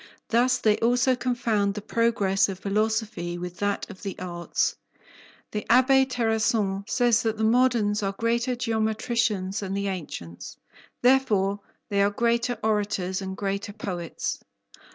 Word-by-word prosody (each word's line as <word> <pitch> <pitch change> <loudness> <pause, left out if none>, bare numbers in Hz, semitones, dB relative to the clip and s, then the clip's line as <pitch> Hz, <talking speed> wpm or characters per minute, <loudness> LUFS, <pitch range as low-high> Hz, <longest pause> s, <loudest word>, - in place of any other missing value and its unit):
Thus 250 +2 +3
they 215 -3 +2
also 245 +2 +3
confound 225 -5 0
the 210 - -4
progress 210 -5 +2
of 190 - -4
philosophy 210 -3 -1
with 180 0 -6
that 205 0 -1
of 200 -3 -12
the 195 -2 -5
arts. 175 -1 -2 0.8
The 210 - -3
Abbé 265 +2 +5
Terrasson 220 -4 0
says 240 -2 +3
that 225 -1 -1
the 220 - -1
moderns 225 -3 +3
are 195 -1 -1
greater 235 +4 0
geometricians 220 -3 -1
than 195 -1 -4
the 200 0 -1
ancients; 115 - -7 0.5
therefore 210 -7 +3 0.3
they 200 -1 +2
are 200 - +4
greater 235 +3 0
orators 205 -3 0
and 190 0 -5
greater 200 0 -3
poets." 180 -5 -4
210 Hz, 135 wpm, -26 LUFS, 195-235 Hz, 0.8 s, Abbé